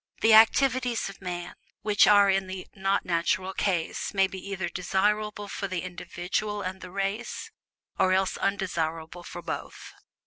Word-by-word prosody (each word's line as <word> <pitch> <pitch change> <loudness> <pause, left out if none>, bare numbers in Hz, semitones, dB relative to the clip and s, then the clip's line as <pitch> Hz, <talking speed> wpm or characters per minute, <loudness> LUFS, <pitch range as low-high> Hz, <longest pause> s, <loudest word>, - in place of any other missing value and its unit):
The 225 0 +6
activities 245 +1 +4
of 195 - -12
man 175 -2 -5 0.3
which 210 -1 +5
are 205 -1 +7
in 195 -1 +2
the 185 -1 -6
"not 195 0 0
natural" 180 +2 0
class 185 +1 -1
may 195 0 +5
be 190 0 -6
either 190 -3 -2
desirable 205 +4 0
for 200 0 -4
the 185 -2 -3
individual 185 +3 -3
and 185 +1 -5
the 185 - -8
race, 195 +5 -3 0.5
or 185 - +4
else 190 0 +2
undesirable 175 -4 -2
for - - -8
both. - - -6
190 Hz, 150 wpm, -27 LUFS, 180-205 Hz, 0.5 s, are